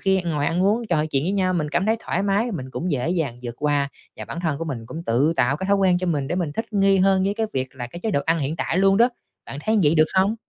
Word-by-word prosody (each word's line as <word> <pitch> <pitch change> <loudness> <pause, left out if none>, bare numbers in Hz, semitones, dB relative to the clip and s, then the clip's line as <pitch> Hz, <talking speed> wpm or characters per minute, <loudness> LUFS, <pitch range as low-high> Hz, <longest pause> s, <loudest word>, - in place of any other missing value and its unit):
khi 190 -1 +2
ngồi 150 -4 -1
ăn 175 +4 0
uống 220 +4 +1
trò 155 -3 +1
chuyện 140 -1 0
với 185 - 0
nhau, 185 -2 +1
mình 155 -3 -1
cảm 180 +6 0
thấy 220 +1 +2
thoải - - -2
mái, 205 +4 +1
mình 130 -7 -5
cũng 175 +6 -3
dễ 145 +2 -1
dàng 150 -9 -2
vượt 120 -1 -5
qua, 145 -1 +1 0.3
và - - -7
bản 170 - -6
thân 155 -4 -1
của 165 - -3
mình 125 -8 -5
cũng 165 +6 -7
tự 130 +8 +2
tạo 135 +4 +2
cái 190 - -4
thói 200 - +4
quen 185 -2 +3
cho 185 - -3
mình 145 -5 -1
để 175 - -1
mình 175 -5 -2
thích 225 +5 -5
nghi 195 -1 +3
hơn 190 0 +3
với 200 +1 0
cái 220 0 -1
việc 130 -1 -3
là 120 -2 -4
cái 170 +8 -10
chế 220 - -1
độ 140 - +1
ăn 165 +1 +2
hiện 150 +2 -2
tại 165 - -1
luôn 195 0 +4
đó. 235 +3 +5 0.4
Bạn 135 - -6
thấy 220 0 +2
vậy 150 +2 +4
được 155 -1 +5
không? 190 +3 +3
170 Hz, 310 wpm, -23 LUFS, 145-195 Hz, 0.4 s, đó